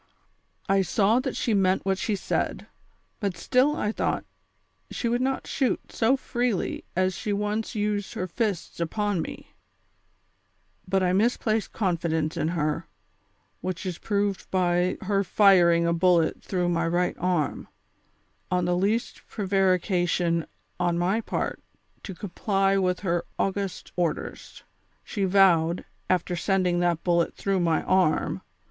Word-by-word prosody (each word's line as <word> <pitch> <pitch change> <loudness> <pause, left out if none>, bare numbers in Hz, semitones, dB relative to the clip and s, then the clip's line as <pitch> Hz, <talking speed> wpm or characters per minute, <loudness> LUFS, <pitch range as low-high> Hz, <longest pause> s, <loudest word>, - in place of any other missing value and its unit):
I 195 0 +3
saw 200 +5 +2
that 265 0 -3
she 230 - 0
meant 190 -2 +2
what 190 0 +1
she 215 - 0
said, 195 - -2 0.5
but 200 -5 -2
still 260 - +2
I 210 - -1
thought - - -1 0.6
she 235 - -3
would 240 +2 +1
not 265 +1 -1
shoot 265 -3 -1
so 240 +4 +2
freely 245 -6 -2
as 185 +1 +2
she 210 - -4
once 210 +2 -2
used 205 -1 -1
her 185 - -2
fists 195 -1 -3
upon 200 +2 -1
me; - - -8 1.3
but 190 0 +1
I 180 0 +2
misplaced 220 +1 +1
confidence 165 -5 -1
in - - 0
her, 155 -3 -1 0.7
which 185 +1 -4
is 180 -3 -4
proved 200 -2 -1
by 180 -1 +1
her 200 0 +1
firing 175 -4 +5
a 170 - +2
bullet 170 -1 +2
through 180 -2 -1
my 170 -1 +1
right 175 +2 0
arm, 175 -4 -1 0.8
on 180 -1 +1
the 175 0 +1
least 205 +6 0
pre 210 - -4
varication 180 -3 +1 0.3
on 175 -1 +1
my 190 +6 +1
part - - -3 0.4
to 190 - -7
comply 195 +1 0
with 185 -2 +1
her 175 -3 0
august 195 -1 -2
orders. 175 -3 -3 0.4
She 200 -3 -2
vowed, 180 -3 +4 0.2
after 180 -1 +1
sending 180 -1 +1
tliat 175 -2 +1
bullet 170 -1 +1
through 195 -1 0
my 165 -2 +1
arm. 185 -4 +1
185 Hz, 140 wpm, -26 LUFS, 175-205 Hz, 1.3 s, firing